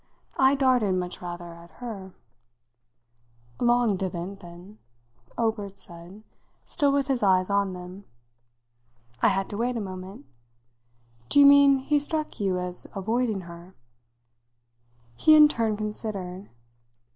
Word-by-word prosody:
I 265 +1 +5
darted, 250 -8 +2
much 180 -1 -4
rather, 175 -1 -7
at 170 0 -15
her." 200 -6 -8 1.4
"Long 240 -4 +2
didn't, 185 +1 -5
then," 175 +4 -13 0.6
Obert 215 -4 -2
said, 175 +4 -11 0.4
still 285 -1 +1
with 280 -1 +1
his 265 -3 0
eyes 185 -1 +2
on 200 -1 +1
them. 180 +2 -10 1.2
I - - +5
had 195 -1 0
to 205 - -5
wait 240 +2 -1
a - - -2
moment. 185 -5 -8 1.0
"Do - - +4
you 285 - +8
mean 280 -1 +7
he 290 +3 +1
struck 305 +1 -3
you 190 -3 0
as 180 0 -4
avoiding 220 +1 -1
her?" 170 +1 -12 1.4
He 310 - +6
in 300 -1 +9
turn 225 -7 -1
considered. 205 -3 -6
200 Hz, 125 wpm, -26 LUFS, 185-245 Hz, 1.4 s, in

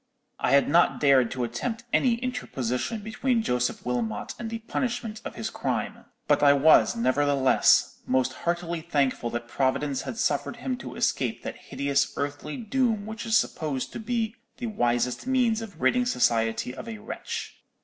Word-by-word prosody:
I 125 - +1
had 140 - +5
not 170 +4 +3
dared 135 -4 +5
to 130 -1 -3
attempt 220 - -3
any 245 -3 +4
interposition 220 - -3
between 230 +2 0
Joseph 125 - -1
Wilmot 115 -4 -2
and 230 -2 -4
the 230 - -3
punishment 230 -1 -3
of - - -7
his - - -4
crime; - - -3 0.2
but - - +3
I 145 -1 +7
was, 140 -5 +5
nevertheless, 135 +2 +3
most 130 0 +1
heartily 170 +1 -2
thankful 140 -7 0
that 120 0 -4
Providence 135 +2 0
had - - -6
suffered 145 - 0
him 255 +2 -3
to - - -8
escape - - -1
that - - -5
hideous 140 0 0
earthly 145 +1 -4
doom 230 -2 0
which 220 +2 -6
is 220 0 +5
supposed 150 -10 -2
to - - -5
be 225 -1 -1 0.2
the 245 - -5
wisest 120 - 0
means 245 -4 +2
of 200 -7 -9
ridding 250 +5 +2
society 115 - +1
of 220 - -8
a 225 - -6
wretch. 210 - -6
155 Hz, 165 wpm, -26 LUFS, -, 0.2 s, I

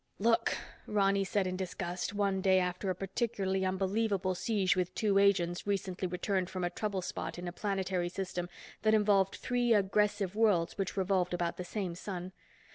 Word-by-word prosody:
"Look," 230 +2 +2 0.3
Ronny 200 -1 +2
said 195 +1 0
in 185 0 -2
disgust 185 -1 -3
one 200 -2 0
day 190 0 +4
after 180 +2 -1
a 185 - 0
particularly 195 0 -1
unbelievable 190 +1 0
siege 190 -1 +1
with 180 0 -1
two 200 -2 +3
agents 185 -2 +2
recently 190 -2 -1
returned 180 +1 -1
from 185 -1 -4
a 175 - 0
trouble 195 -1 -2
spot - - -4
in 175 0 -5
a - - -3
planetary 190 -2 -1
system 180 -1 -4 0.3
that 220 0 +4
involved 200 -2 +3
three 245 -2 +2
aggressive 200 -1 +1
worlds 205 -7 +3
which 195 -1 -3
revolved 185 -2 +1
about 170 -1 -2
the 180 - -4
same 185 -1 -3
sun. 180 0 -6
190 Hz, 170 wpm, -32 LUFS, 180-205 Hz, 0.3 s, day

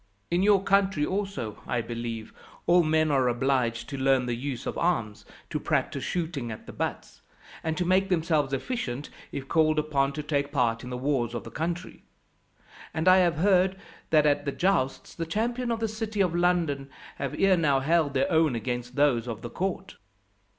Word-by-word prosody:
In 175 +1 +2
your 200 -1 +4
country 195 -6 +2
also, 195 - -3
I 120 - 0
believe, 115 -1 -5 0.3
all 175 +1 +5
men 155 -1 +2
are 135 -3 +3
obliged 120 -1 0
to 140 - -5
learn 130 -1 +3
the 120 - -1
use 125 +1 -4
of - - -3
arms, 115 -12 -1 0.3
to - - -1
practise - - -1
shooting 160 -9 -3
at 110 - -8
the - - -9
butts, - - -4 0.4
and 160 0 -2
to 180 - 0
make 190 +2 +3
themselves 160 -5 +1
efficient, 140 - -3 0.2
if 135 -1 -5
called 155 0 +3
upon 145 -2 +1
to 150 +1 -4
take 145 -1 -1
part 120 -5 +1
in 125 - -7
the 125 - -4
wars 125 -3 0
of 120 - -4
the - - -10
country. 170 +2 -4 0.9
And 160 +2 -1
I 185 0 +8
have 175 -4 +3
heard 190 +2 +3 0.3
that 155 -1 +4
at 145 0 +2
the 140 - 0
jousts, 155 -6 0
the 165 -1 -4
champions 235 +6 -1
of 225 - -3
the 225 - 0
city 220 -1 -2
of 180 -3 +2
London 170 -6 +1 0.3
have 140 +1 -3
ere 195 -1 +5
now 145 -6 +2
held 150 0 +1
their 135 +8 +1
own 160 -5 +3
against 120 +1 -4
those 135 -5 +2
of 115 -2 -5
the 120 - -6
court." 190 +1 -3
150 Hz, 190 wpm, -27 LUFS, 130-180 Hz, 0.9 s, I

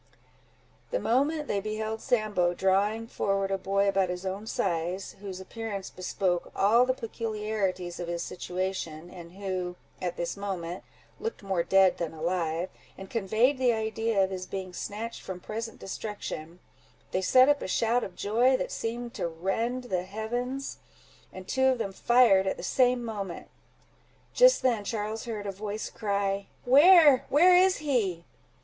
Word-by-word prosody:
The - - -1
moment 290 +5 +1
they 200 - 0
beheld 215 +2 -3
Sambo, 205 -7 +1
drawing 200 +5 +1
forward 195 -3 -1
a 195 - +1
boy 195 +1 +1
about 195 -2 +2
his 180 +1 -4
own 195 +3 -4
size, 180 -1 -2
whose 190 -2 -6
appearance 200 0 -6
bespoke 180 -1 -2
all 230 +5 +4
the 255 - +1
peculiarities 210 -6 -3
of 175 - -4
his 170 0 -3
situation, 180 -3 -4
and 170 -1 -11
who 185 -2 -4 0.3
at 175 -1 -3
this 170 0 -2
moment, 185 -3 -5 0.4
looked 455 - -5
more 190 -3 0
dead 190 +2 +4
than 165 -2 -3
alive, 165 +1 -1 0.3
and 190 0 -10
conveyed 230 +5 +2
the 250 -2 +3
idea 220 -1 0
of 190 - -1
his 185 -1 -5
being 190 -2 -5
snatched 220 +5 -5
from 185 -1 -6
present 225 +4 -6
destruction, 180 -5 -6 0.5
they 185 - 0
set 255 +7 +6
up 290 0 +3
a - - -3
shout 230 +5 +1
of 180 - -7
joy, 240 +6 +3
that - - -4
seemed 235 +1 -4
to - - -2
rend 195 +10 -2
the 185 -7 -1
heavens, 240 +7 -4 0.5
and 185 0 -10
two 265 0 +1
of 260 -1 +3
them 195 -4 -3
fired 225 -4 +4
at - - -1
the - - -8
same 250 -2 +2
moment. 200 -6 -5 0.8
Just - - +6
then 235 -5 +2
Charles 215 +1 -3
heard 215 -3 -5
a 200 - -2
voice 205 +2 -5
cry, 200 -2 -1 0.2
"Where, 290 +1 +7
where 355 +6 +6
is 370 +1 +5
he?" 215 - -1
200 Hz, 160 wpm, -28 LUFS, 185-235 Hz, 0.8 s, Where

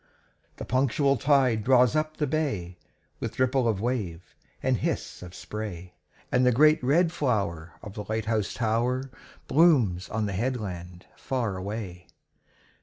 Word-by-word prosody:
The - - -7
punctual 135 +2 +2
tide 130 -4 +2
draws 125 +2 +4
up 155 0 -1
the 150 - +1
bay, 120 - -2 0.4
With 115 -1 -5
ripple 130 -1 +2
of 110 -4 0
wave 100 -8 -3 0.3
and - - +2
hiss - - -3
of 90 -1 -10
spray, 95 -5 -7 0.4
And 125 - +3
the 125 - +5
great 150 +4 +4
red 165 +6 +3
flower 100 - -1
of 105 - -8
the 105 -2 -6
light 110 0 -1
house 110 -2 -1
tower 125 +3 0 0.4
Blooms 125 - +3
on 110 -1 -1
the 100 - -3
headland 90 -6 -4
far 120 -8 -2
away. 95 -2 -6
115 Hz, 145 wpm, -27 LUFS, 95-130 Hz, 0.4 s, the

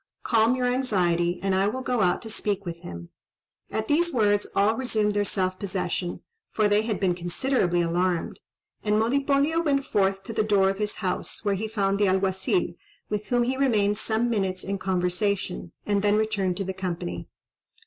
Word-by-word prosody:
Calm 230 +1 +3
your 255 -1 -1
anxiety, 180 -9 +1
and 195 -1 +1
I 190 +1 +2
will 255 +5 -3
go 250 -3 0
out 180 +4 +2
to 225 - -7
speak 205 -2 -2
with 170 -1 -5
him." 85 - -9 0.6
At 220 0 -2
these 340 +3 +2
words 205 -5 +2
all 205 +3 +3
resumed 220 -4 0
their 205 0 +1
self 185 -2 -1
possession, 180 -2 -3 0.3
for 215 -1 +2
they 205 +1 +3
had 220 -1 -2
been 185 -3 +2
considerably 175 +1 0
alarmed; 175 0 -1 0.4
and 210 0 +2
Monipodio 280 +7 +2
went 280 -3 +1
forth 195 -2 +1
to 225 - -6
the 215 - +1
door 200 -2 +3
of 195 - -7
his 210 -1 -1
house, 185 +3 -3
where 200 - +2
he 205 +3 -2
found 200 -2 0
the 205 - +4
Alguazil, 190 - +1 0.4
with 210 0 -2
whom 245 0 +2
he 260 +2 -1
remained 210 -6 +2
some 220 +2 0
minutes 190 -5 -1
in 195 0 -3
conversation, 185 0 -1
and 205 -1 +1
then 205 0 +3
returned 200 -4 0
to 195 - -1
the 190 0 -4
company. 170 - -4
205 Hz, 185 wpm, -26 LUFS, 185-225 Hz, 0.6 s, the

